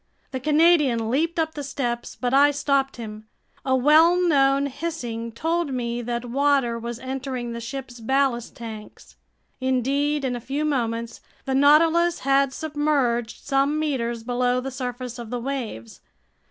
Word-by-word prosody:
The 260 - -3
Canadian 295 -6 +3
leaped 325 +6 0
up 320 -1 0
the 290 - -5
steps, 245 -4 -3
but 250 0 -2
I 285 +1 +6
stopped 275 -1 0
him. 215 -2 -8 0.4
A 260 0 +2
well 310 +7 +5
known 280 -5 +3
hissing 255 -6 -4
told 325 +5 -1
me 240 -1 -2
that 240 0 -3
water 265 -2 +1
was 235 0 -5
entering 260 -2 -4
the 235 - -6
ship's 245 0 -7
ballast 260 0 0
tanks. 220 -2 -10 0.4
Indeed, 275 +3 0
in 250 -1 -1
a 240 - -6
few 275 +6 -2
moments 235 -5 -2 0.2
the 265 - -1
Nautilus 325 +5 +4
had 275 0 +3
submerged 285 -6 -1
some 275 +2 +1
meters 240 -7 -2
below 245 +1 +1
the 270 +1 -5
surface 250 -1 -5
of 235 -2 -7
the 245 +1 -3
waves. 235 - -5
265 Hz, 150 wpm, -24 LUFS, 240-290 Hz, 0.4 s, I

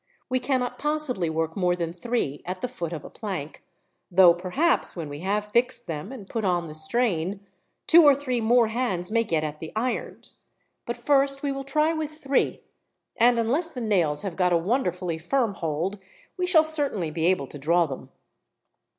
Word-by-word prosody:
We 255 0 +1
cannot 255 -1 -1
possibly 295 - 0
work 160 0 -2
more 180 -2 +1
than 170 -1 -3
three 175 - -2
at 185 +1 -5
the - - -1
foot 175 -10 -5
of 160 -3 -6
a - - -8
plank, 185 -9 -6 0.5
though 180 -1 +7
perhaps, 185 - 0
when 165 -4 -5
we 145 0 -7
have 205 +4 -2
fixed 240 +1 +1
them 155 - -5
and 225 -8 -9
put 225 +1 -3
on 175 -3 0
the 155 - -8
strain, 190 +2 -1 0.4
two 340 +1 +8
or 290 -2 +7
three 255 -4 -2
more 230 0 +4
hands 215 -6 -1
may 230 0 +3
get 165 -8 -1
at 150 0 -4
the 160 - -7
irons; 240 +3 -3 0.5
but 235 0 -3
first 275 +2 +2
we 285 - 0
will 275 0 -4
try 300 +4 +1
with 310 -1 -3
three, 275 -3 0 0.5
and, 240 +1 +4
unless 275 +10 0
the 250 - -5
nails 175 -10 +1
have 190 -4 -4
got 180 -1 +2
a 170 - +4
wonderfully 180 -4 -1
firm 230 +5 0
hold, 170 +4 -3 0.4
we 365 -1 -1
shall 330 -4 +6
certainly 285 - -1
be 160 +1 0
able 180 -6 +2
to 145 +2 -10
draw 170 +4 +3
them." 135 -4 -8
205 Hz, 190 wpm, -25 LUFS, 170-255 Hz, 0.5 s, two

